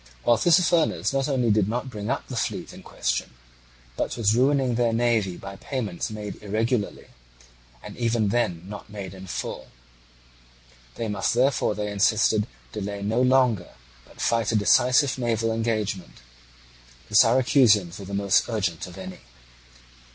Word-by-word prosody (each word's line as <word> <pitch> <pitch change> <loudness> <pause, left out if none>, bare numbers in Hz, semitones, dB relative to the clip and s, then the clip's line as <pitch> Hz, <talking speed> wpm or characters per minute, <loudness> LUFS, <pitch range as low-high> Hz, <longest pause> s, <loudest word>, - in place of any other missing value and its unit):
While 120 -1 +3
Tissaphernes 170 -3 +3
not 135 +1 0
only 125 -5 +1
did 105 -2 +2
not 125 +3 -3
bring 105 -1 -5
up 135 - -2
the 130 - -6
fleet 115 - -3
in - - -12
question, - - -3 0.6
but - - -3
was 110 -2 +2
ruining 130 0 +2
their 115 -1 +1
navy 115 -6 +1
by 95 0 -9
payments 110 -6 -4
made 105 -2 -7
irregularly, 110 +1 -2 0.7
and - - -9
even 115 -3 0
then 90 -7 0
not 105 +1 -9
made 100 -3 -7
in 95 0 -10
full. - - -5 1.3
They 115 - -3
must 105 +2 -1
therefore, 130 -4 +2
they 105 0 -3
insisted, 105 +1 +2 0.2
delay 100 -1 -5
no 110 +4 +1
longer, 125 -7 +2 0.3
but - - -19
fight 115 -1 +1
a - - 0
decisive 125 +6 +3
naval 115 -2 0
engagement. 105 - -3 0.9
The - - -4
Syracusans 115 - +4
were 100 - -8
the 100 +1 -5
most 100 +2 +2
urgent 95 -8 -2
of 90 +1 -12
any. 95 -1 -8
110 Hz, 150 wpm, -25 LUFS, 100-120 Hz, 1.3 s, Syracusans